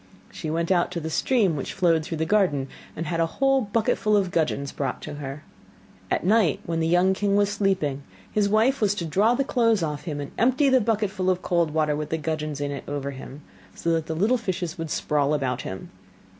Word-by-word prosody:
She 155 Hz, -, -5 dB
went 165 Hz, +3 st, -1 dB
out 175 Hz, -2 st, +3 dB
to 170 Hz, -, -2 dB
the 160 Hz, 0 st, -5 dB
stream 205 Hz, -, +2 dB
which 140 Hz, -, -4 dB
flowed 170 Hz, -4 st, +2 dB
through 160 Hz, +1 st, -4 dB
the 160 Hz, -, 0 dB
garden, 160 Hz, -8 st, +2 dB, 0.3 s
and 165 Hz, -, -4 dB
had 165 Hz, +1 st, -2 dB
a 165 Hz, -, +3 dB
whole 270 Hz, 0 st, +3 dB
bucketful 215 Hz, 0 st, +1 dB
of 190 Hz, -3 st, 0 dB
gudgeons 150 Hz, -4 st, 0 dB
brought 135 Hz, -3 st, -3 dB
to 150 Hz, -, -6 dB
her. 140 Hz, +1 st, -6 dB, 0.7 s
At -, -, 0 dB
night 200 Hz, -6 st, +3 dB
when 165 Hz, -1 st, -2 dB
the 160 Hz, -, +1 dB
young 180 Hz, +3 st, +4 dB
king 200 Hz, +1 st, 0 dB
was 205 Hz, 0 st, +3 dB
sleeping, 190 Hz, -9 st, 0 dB, 0.3 s
his 205 Hz, -1 st, +1 dB
wife 225 Hz, +6 st, +2 dB
was 205 Hz, -1 st, +2 dB
to 170 Hz, -, -3 dB
draw 205 Hz, +9 st, +3 dB
the 275 Hz, -, +1 dB
clothes 230 Hz, -7 st, +2 dB
off 150 Hz, -1 st, -3 dB
him 150 Hz, -4 st, -4 dB
and 145 Hz, -, -6 dB
empty 260 Hz, +4 st, +3 dB
the 260 Hz, -1 st, +4 dB
bucket 215 Hz, -2 st, 0 dB
full 185 Hz, -1 st, -1 dB
of 185 Hz, -1 st, 0 dB
cold 170 Hz, -2 st, +1 dB
water 150 Hz, -1 st, +1 dB
with 150 Hz, 0 st, -4 dB
the 160 Hz, -, -1 dB
gudgeons 155 Hz, -2 st, -3 dB
in 145 Hz, 0 st, -2 dB
it 140 Hz, -, -5 dB
over 140 Hz, -1 st, -3 dB
him, 135 Hz, +2 st, -10 dB, 0.3 s
so 170 Hz, -, -1 dB
that 165 Hz, -1 st, 0 dB
the 160 Hz, -, -3 dB
little 215 Hz, +9 st, +2 dB
fishes 180 Hz, -5 st, -3 dB
would 165 Hz, -3 st, -5 dB
sprawl 150 Hz, 0 st, +1 dB
about 130 Hz, -3 st, -1 dB
him. 95 Hz, -, -7 dB
170 Hz, 225 wpm, -25 LUFS, 150-205 Hz, 0.7 s, young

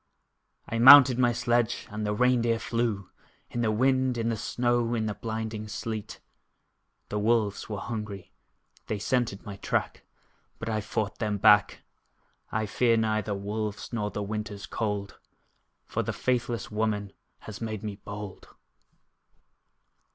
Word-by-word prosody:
I 115 Hz, -, -2 dB
mounted 130 Hz, 0 st, +10 dB
my 120 Hz, -1 st, +4 dB
sledge, 120 Hz, 0 st, 0 dB
and 105 Hz, 0 st, -3 dB
the 105 Hz, -, 0 dB
rein 125 Hz, +1 st, +3 dB
deer 115 Hz, -1 st, +1 dB
flew, 115 Hz, -5 st, -2 dB, 0.4 s
In 120 Hz, -, -2 dB
the 115 Hz, -, +2 dB
wind, 130 Hz, +2 st, +2 dB
in 115 Hz, 0 st, 0 dB
the 115 Hz, -, 0 dB
snow, 120 Hz, +1 st, 0 dB
in 110 Hz, -1 st, -1 dB
the 105 Hz, -, -1 dB
blinding 110 Hz, -1 st, -4 dB
sleet: 110 Hz, 0 st, -5 dB, 0.9 s
The 105 Hz, -, -2 dB
wolves 110 Hz, -1 st, +1 dB
were 105 Hz, -, -3 dB
hungry 105 Hz, -3 st, -6 dB, 0.6 s
they 110 Hz, -, -2 dB
scented 110 Hz, -1 st, -1 dB
my 100 Hz, -1 st, -7 dB
track -, -, -2 dB, 0.5 s
But -, -, -5 dB
I 110 Hz, -1 st, 0 dB
fought 105 Hz, 0 st, -3 dB
them 105 Hz, -2 st, -1 dB
back! 105 Hz, +1 st, +5 dB, 0.7 s
I 110 Hz, 0 st, 0 dB
fear 115 Hz, +2 st, +2 dB
neither 110 Hz, -2 st, 0 dB
wolves, 105 Hz, +2 st, -4 dB
nor 105 Hz, -3 st, -1 dB
the 105 Hz, -, -4 dB
winter's 105 Hz, 0 st, -5 dB
cold, 105 Hz, -3 st, -3 dB, 0.7 s
For -, -, -2 dB
the -, -, -3 dB
faithless 120 Hz, -4 st, -1 dB
woman 105 Hz, -2 st, -1 dB, 0.3 s
has 110 Hz, 0 st, -9 dB
made 110 Hz, -2 st, -4 dB
me 105 Hz, -2 st, -5 dB
bold. 100 Hz, -1 st, -8 dB
110 Hz, 145 wpm, -28 LUFS, 105-120 Hz, 0.9 s, mounted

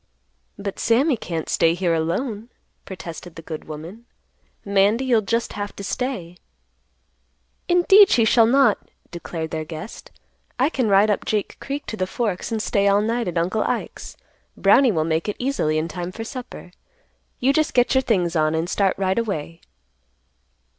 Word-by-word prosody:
"But 200 Hz, -1 st, -5 dB
Sammy 255 Hz, +6 st, +3 dB
can't 165 Hz, -7 st, -5 dB
stay 165 Hz, 0 st, +2 dB
here 175 Hz, -2 st, 0 dB
alone," 205 Hz, +8 st, -2 dB, 0.4 s
protested 175 Hz, -1 st, -9 dB
the 165 Hz, -, -10 dB
good 155 Hz, -1 st, -7 dB
woman. 165 Hz, +10 st, -9 dB, 0.6 s
"Mandy, 200 Hz, +5 st, +2 dB
you'll 240 Hz, -4 st, +3 dB
just 230 Hz, +3 st, -1 dB
have 205 Hz, 0 st, -5 dB
to 200 Hz, -, -8 dB
stay." 195 Hz, -7 st, -4 dB, 1.3 s
"Indeed, 385 Hz, +3 st, +6 dB
she 230 Hz, -, +4 dB
shall 225 Hz, 0 st, +5 dB
not," 270 Hz, +2 st, +4 dB, 0.3 s
declared 165 Hz, -2 st, -6 dB
their 160 Hz, -1 st, -3 dB
guest. 160 Hz, +6 st, -9 dB, 0.5 s
"I 265 Hz, +4 st, +2 dB
can 255 Hz, -8 st, -1 dB
ride 200 Hz, +2 st, +5 dB
up 205 Hz, -, -1 dB
Jake 210 Hz, -2 st, -2 dB
Creek 280 Hz, +1 st, -5 dB
to 220 Hz, -, -6 dB
the 185 Hz, -, -1 dB
Forks 210 Hz, -1 st, -3 dB
and 220 Hz, -1 st, -1 dB
stay 200 Hz, -2 st, +1 dB
all 200 Hz, +1 st, +4 dB
night 230 Hz, 0 st, -1 dB
at 175 Hz, -1 st, -3 dB
Uncle 185 Hz, +6 st, 0 dB
Ike's. -, -, -4 dB, 0.4 s
Brownie 240 Hz, +6 st, +5 dB
will 160 Hz, -5 st, 0 dB
make 160 Hz, +4 st, -1 dB
it 210 Hz, -, -2 dB
easily 245 Hz, -, 0 dB
in 155 Hz, +1 st, -1 dB
time 175 Hz, +1 st, -5 dB
for 225 Hz, -, -6 dB
supper. 245 Hz, -6 st, -9 dB, 0.7 s
You 265 Hz, +3 st, +3 dB
just 310 Hz, +1 st, 0 dB
get 245 Hz, -1 st, +3 dB
your 265 Hz, -, +4 dB
things 180 Hz, -9 st, 0 dB
on 155 Hz, 0 st, +2 dB
and 160 Hz, +1 st, -1 dB
start 195 Hz, 0 st, +1 dB
right 190 Hz, +2 st, 0 dB
away." 165 Hz, -7 st, -4 dB
200 Hz, 165 wpm, -22 LUFS, 170-235 Hz, 1.3 s, Indeed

